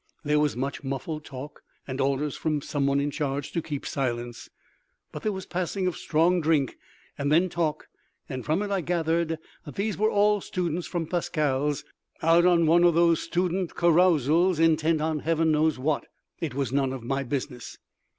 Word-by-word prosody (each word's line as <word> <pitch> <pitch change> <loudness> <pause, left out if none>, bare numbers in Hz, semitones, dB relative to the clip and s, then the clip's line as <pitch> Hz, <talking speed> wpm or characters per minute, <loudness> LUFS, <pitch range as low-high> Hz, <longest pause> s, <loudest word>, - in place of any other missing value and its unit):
There 150 0 +2
was 150 -4 +1
much 135 +3 -3
muffled 150 +3 -4
talk, 135 +2 -9 0.3
and 135 0 -3
orders 140 +2 0
from 150 -3 -1
some 140 -2 -1
one 140 0 +2
in 145 +1 -1
charge 140 -1 -3
to 170 - -1
keep 150 -3 -5
silence. 120 -3 -3 0.6
But - - -7
there 215 - 0
was 190 -1 -6
passing 185 +1 -2
of 180 -3 0
strong 170 +3 +2
drink, 150 -4 +1 0.4
and 140 +1 0
then 175 +4 +4
talk, 160 -3 -2 0.4
and 130 -3 -5
from 160 +7 0
it 205 - -4
I 195 -2 +1
gathered 165 -1 0 0.3
that 145 - -10
these 205 +1 -2
were 215 +1 +3
all 210 -1 +3
students 175 -2 -2
from 175 -3 -2
Pascale's, 150 -4 -1 0.4
out 165 +2 +5
on 170 -2 +4
one 170 +2 +5
of 175 -2 +5
those 170 -1 +4
student 180 +1 -1
carousals, 170 0 +4
intent 160 -1 +3
on 155 0 0
heaven 160 +1 +1
knows 155 -1 +2
what! 145 +3 -1 0.3
It 155 -6 -3
was 135 -4 -1
none 135 -1 +1
of 130 -3 -6
my 135 +3 -1
business. 130 -2 -5
155 Hz, 180 wpm, -26 LUFS, 140-175 Hz, 0.6 s, out